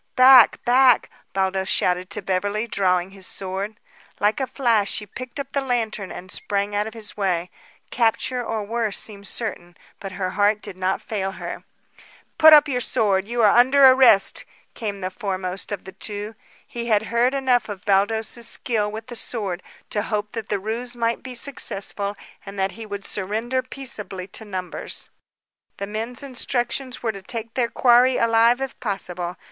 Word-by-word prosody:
"Back! 255 -2 +7
Back!" 250 0 +5 0.2
Baldos 190 0 0
shouted 180 +1 +1
to 200 0 -5
Beverly, 200 +4 -1
drawing 185 -4 0
his 195 -1 -11
sword. 195 +3 -5 0.4
Like 210 +4 +2
a 265 - -1
flash, 230 -7 +1
she 210 - -1
picked 255 +6 -8
up 275 -1 -5
the 280 - 0
lantern 225 -6 -2
and 185 +1 -8
sprang 200 0 -2
out 210 +1 0
of 220 - -9
his 215 -2 -7
way. 180 -3 -1 0.4
Capture 245 +2 +1
or 225 -2 -3
worse 225 0 -2
seemed 200 -2 -3
certain; 175 -7 -4 0.2
but 195 -1 -7
her 185 -1 -2
heart 205 +2 +2
did 190 - -8
not 185 +1 -1
fail 195 -3 -3
her. - - -7 0.7
"Put 315 0 +9
up 300 0 +8
your 250 -3 -1
sword! 200 -4 +1
You 235 0 0
are 210 - +6
under 265 +3 +6
arrest!" 250 -7 +6 0.3
came 210 -3 -4
from 195 - -12
the 185 0 -3
foremost 190 -2 -4
of 205 - -4
the 190 - -9
two. 210 +2 -5 0.3
He 235 -1 -6
had 215 -2 +3
heard 245 +3 +3
enough 255 -4 +2
of 205 -1 -7
Baldos's 220 +4 +1
skill 210 -4 0
with 220 +1 -7
the 240 - -9
sword 200 -7 -3 0.3
to 210 - 0
hope 210 -1 -3
that 225 -2 -6
the 205 - 0
ruse 230 +5 -4
might 230 -1 -1
be 255 -1 -8
successful 205 -5 -3 0.3
and 200 0 -9
that 190 0 0
he 225 +1 -9
would 200 -1 -6
surrender 220 +6 -2
peaceably 235 -8 -6
to 220 - -9
numbers. 185 -3 -6 0.7
The 200 - -3
men's 225 +5 -5
instructions 255 0 -3
were 225 - +1
to 195 -2 -10
take 225 +3 -5
their 245 -3 +1
quarry 250 +1 +4
alive 230 +2 +4
if 270 -1 -5
possible. 180 -5 -4
215 Hz, 175 wpm, -23 LUFS, 195-240 Hz, 0.7 s, Put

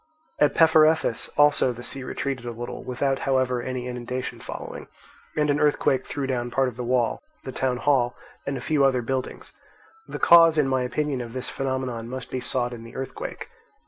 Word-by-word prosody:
At 145 -1 +3
Peparethus 160 -5 +4
also 145 -3 +4
the 120 +1 -10
sea 135 - -4
retreated 135 -1 -3
a - - -2
little, 120 +1 -6
without 135 +2 -1
however 130 -2 +1
any 130 0 -4
inundation 125 +1 -4
following; - - -7 0.5
and 150 -1 +3
an 145 - +1
earthquake 140 -3 +2
threw 140 - -3
down 120 -2 -2
part 130 +1 +1
of 120 - -12
the 125 - -5
wall, 120 -1 +1 0.2
the 130 - -6
town 130 -1 -1
hall, 125 -3 +2 0.3
and 140 - -1
a - - -6
few 145 +1 +1
other 130 -3 +3
buildings. 130 +1 -4 0.5
The - - -5
cause, 165 -2 +7
in 150 -3 +3
my 130 -1 +1
opinion, 135 +1 -1
of 115 -1 -7
this 130 -1 -3
phenomenon 130 -4 -3
must 130 +1 -6
be 130 - -2
sought 125 0 -1
in 115 -1 -8
the 115 +2 -12
earthquake. 135 -1 -6
130 Hz, 190 wpm, -25 LUFS, 125-140 Hz, 0.5 s, cause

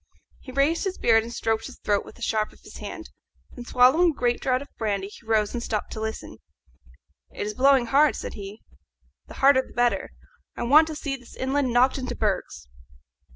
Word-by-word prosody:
He 260 - -11
raised 280 +7 +1
his 380 -1 -3
beard 225 -1 +4
and 230 +1 -8
stroked 225 -1 -1
his 265 - -12
throat 205 -1 0
with - - -14
the 240 - -10
sharp 215 -2 0
of - - -20
his - - -12
hand. - - -8 0.4
Then, 245 - -10
swallowing 260 +9 +5
a - - -1
great 240 -1 +1
draught 255 +1 0
of 285 - -22
brandy, 200 -3 -2
he 220 - -16
rose 215 -2 +1
and 240 - -3
stopped 215 -3 -3
to - - -6
listen. 220 0 -5 0.9
"It - - -5
is 210 - -3
blowing 265 +1 +4
hard," 280 +4 +3
said - - -6
he; 200 +1 -9 0.7
"the - - -12
harder 270 -1 +5
the - - -16
better. 240 0 +1 0.5
I - - -3
want 300 +6 +6
to 315 - -5
see 285 -2 -3
this 245 -2 -16
island 265 0 0
knocked 255 +3 +3
into 255 -1 -4
bergs. 190 - -2
245 Hz, 205 wpm, -25 LUFS, 220-275 Hz, 0.9 s, want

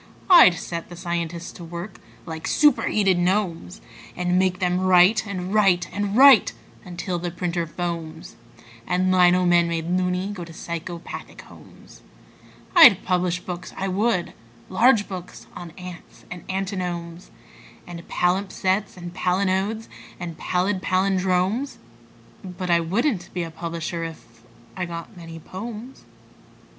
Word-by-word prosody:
I'd 335 - +9
set 170 0 -6
the 175 - -9
scientists 170 -1 -4
to 175 - -11
work 170 +4 -8 0.3
like 160 -1 -6
superheated 210 -10 +3
gnomes, 175 - -1 0.3
And 180 0 +1
make 185 -1 +1
them 180 -1 0
write 185 +4 +4
and 185 -1 -4
write 195 -5 +3
and 205 +1 -2
write 270 -4 +7 0.3
until 175 0 -4
the 175 +1 -3
printer 170 -1 -3
foams 165 -2 -6 0.5
And 185 +1 +1
lino 180 0 +4
men, 175 -1 +4
made 165 -1 -3
"loony", 180 +2 0
go 190 -4 -6
to 165 -1 -11
psychopathic 170 +1 -7
homes. - - -17 0.7
I'd 260 - +8
publish 180 -1 0
books, 180 -1 -7
I 195 0 -2
would 190 -1 0 0.4
large 220 +2 +4
books 185 -2 -8
on 175 -1 -8
ants 180 -2 -11
and 180 -2 -8
antinomes 180 -3 -4 0.6
And 175 -1 -8
palimpsests 190 +2 0
and 175 -1 -8
palinodes 190 +4 0 0.3
and 175 -2 -6
pallid 185 +3 -1
pallindromes: 190 +6 0 0.7
But 180 -1 -4
I 170 - +5
wouldn't 195 - -1
be 175 - -1
a 165 - -7
publisher 165 0 -5
if.... 135 -8 -10 0.3
I 185 - -3
got 170 +4 -8
many 165 -2 -10
"pomes." 220 - -9
180 Hz, 130 wpm, -23 LUFS, 170-195 Hz, 0.7 s, I'd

